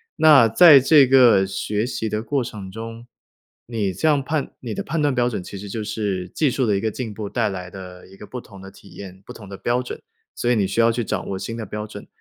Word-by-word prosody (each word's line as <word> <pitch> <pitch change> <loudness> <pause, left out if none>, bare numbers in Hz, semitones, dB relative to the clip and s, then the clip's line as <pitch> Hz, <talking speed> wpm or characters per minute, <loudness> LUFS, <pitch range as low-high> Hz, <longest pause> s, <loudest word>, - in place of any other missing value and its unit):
那 150 -7 +6
在 150 +3 +8
这 135 0 +5
个 125 -7 +6
学 105 +4 -2
习 110 -3 -3
的 105 0 -2
过 130 +3 -1
程 105 -5 -8
中， 115 +3 -9 0.6
你 110 -5 -2
这 155 - -1
样 145 -3 +2
判 150 0 -2
你 115 -5 -6
的 - - -4
判 155 +1 -2
断 145 -3 +1
标 120 0 +2
准 110 -6 -3
其 100 - -9
实 100 +1 -8
就 110 +1 -4
是， 100 -4 -3
技 150 -5 0
术 130 -3 0
的 105 - +2
一 - - 0
个 110 0 -2
进 115 -2 -5
步 105 0 -6
带 - - -1
来 90 -2 -7
的 90 -2 -11
一 95 - -16
个 105 - -12
不 125 - -7
同 100 -5 -14
的 95 - -10
体 100 - -18
验、 95 -1 -11
不 - - -10
同 100 -3 -12
的 100 - -8
标 120 +1 -1
准， 125 - -7 0.4
所 120 - 0
以 - - +3
你 100 -3 +1
需 100 - -3
要 115 0 +4
去 120 0 -2
掌 - - -4
握 95 -1 -4
新 115 0 -6
的 110 - -5
标 105 +2 -6
准。 105 -1 -11
110 Hz, 285 characters per minute, -21 LUFS, 100-125 Hz, 0.6 s, 在